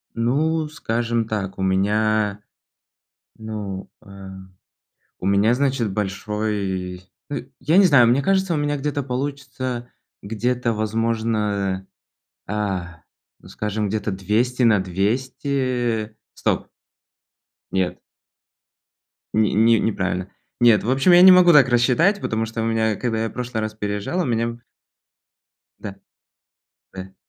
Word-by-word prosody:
Ну, 150 +7 0
скажем 115 -5 -2
так. 100 -3 -4
У - - -5
меня, 105 +2 +1 1.0
ну, 105 -3 -6
э 100 -2 -12 0.9
У 95 - -5
меня, 100 +4 +3
значит, 130 -6 0
большой 95 -2 -3 0.3
ы 140 - -4 0.2
я 155 +8 +3
не 195 - +7
знаю, 130 -7 +6
мне 130 +4 +3
кажется, 190 0 +1
у - - 0
меня 145 0 -1
где-то 145 0 -2
получится 130 -2 -4 0.3
Где-то, 120 +3 -1
возможно, 110 -3 -1 0.6
а, 95 -5 -3 0.4
ну, - - -16
скажем, 105 0 -3
где-то 105 0 -2
200 110 +7 0
на 110 -4 +5
200. 120 +3 -1 0.2
Стоп. - - -1 1.0
Нет. 95 -1 -1 1.4
Ни 110 -2 +3
ни 115 +2 +4
неправильно. 95 -3 -2 0.3
Нет, 115 -3 +5
в 115 - -2
общем, 135 +7 +3
я 175 0 +8
не 185 0 +10
могу 180 -1 +7
так 135 -4 +6
рассчитать, 135 - +3
потому 110 0 -1
что 115 0 -5
у - - -1
меня, 110 -1 +1
когда 115 -1 -2
я - - -3
прошлый 125 -3 -4
раз 110 0 -3
переезжал, 105 - -2
у - - -1
меня 115 -1 -1 1.2
Да. 100 -1 -7 1.0
Да. 95 0 -8
110 Hz, 125 wpm, -22 LUFS, 100-130 Hz, 1.4 s, не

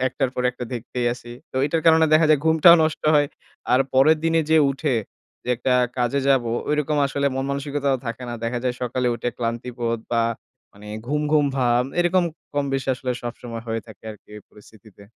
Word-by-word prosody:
একটার 135 -2 -2
পর 125 - -2
একটা 125 0 -7
দেখতেই 120 +1 -4
আছি। 120 -1 -11 0.2
তো - - -8
এইটার 160 +2 0
কারণে 160 0 +6
দেখা 155 0 +5
যায় 150 -2 +4
ঘুমটাও 160 +2 +7
নষ্ট 155 -1 -1
হয়। 145 -1 +4 0.5
আর 125 - +5
পরের 145 +5 +5
দিনে 165 0 +3
যে 160 - +5
উঠে, 140 0 -1 0.5
যে - - -10
একটা 125 +2 0 0.2
কাজে 125 +3 +1
যাবো 125 -4 +2 0.2
ওইরকম 150 0 0
আসলে 140 +1 -1
মনমানসিকতাও 140 0 -1
থাকে 115 +2 -5
না। 120 - -4
দেখা 120 +1 -2
যায় 125 -1 0
সকালে 125 +1 -1
উঠে 120 +1 -3
ক্লান্তিবোধ 115 0 -3
বা 115 - +3 0.5
মানে 105 +1 -15 0.2
ঘুম, 150 +2 -1
ঘুম 150 -2 +4
ভাব 120 -1 +2 0.2
এরকম 175 +1 +2 0.3
কম-বেশি 135 -2 -1
আসলে 125 0 -5
সবসময় 120 -1 -7
হয়ে 115 0 -2
থাকে 110 -1 -15
আর 105 - -10
কি - - -43
এই 105 - -11
পরিস্থিতিতে। 105 -1 -18
130 Hz, 185 wpm, -22 LUFS, 120-150 Hz, 0.5 s, ঘুমটাও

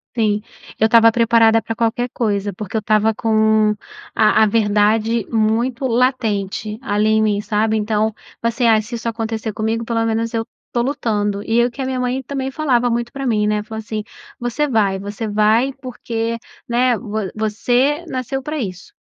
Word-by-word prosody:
Sim, 210 -3 +1 0.4
eu 220 - +4
estava 230 0 +6
preparada 225 -1 +4
pra 225 - -4
qualquer 235 +2 -1
coisa, 205 -3 -1
porque 205 +2 -7
eu - - +3
estava 215 +1 +2
com 220 -1 +3 0.4
a 220 0 +4
a - - +6
verdade 215 +1 +2
muito 235 +4 +1
latente, 220 -4 0
ali 210 -4 0
em 220 0 +3
mim, 210 -1 +1
sabe? 215 +1 0
Então, 215 0 0 0.3
assim, 235 +1 +1
ah, 220 -1 +5
se 230 +3 -7
isso 230 0 -5
acontecer 225 -1 -3
comigo 225 +2 -2
pelo 230 -1 0
menos 225 0 -1
eu 225 0 -1 0.2
estou 240 - -1
lutando, 210 -7 -1
e 225 +2 0
eu 240 +1 +2
que 270 - -7
a 260 - -1
minha 260 -1 -2
mãe 250 +1 -1
também 270 0 -4
falava 255 -5 +1
muito 235 0 -2
pra 275 0 -4
mim 210 -3 +1
né 210 0 0
falou 220 +1 -7
assim: 215 -1 -4 0.4
"você 245 +5 -1
vai 205 -7 +1
você 205 +3 -5
vai 215 +5 +3
porque, 230 -2 -3 0.3
né, 245 0 +2
vo 215 -4 -4
você 245 +8 +1
nasceu 260 +1 -3
pra 305 +3 -4
isso, 190 - -5
225 Hz, 180 wpm, -19 LUFS, 215-240 Hz, 0.4 s, estava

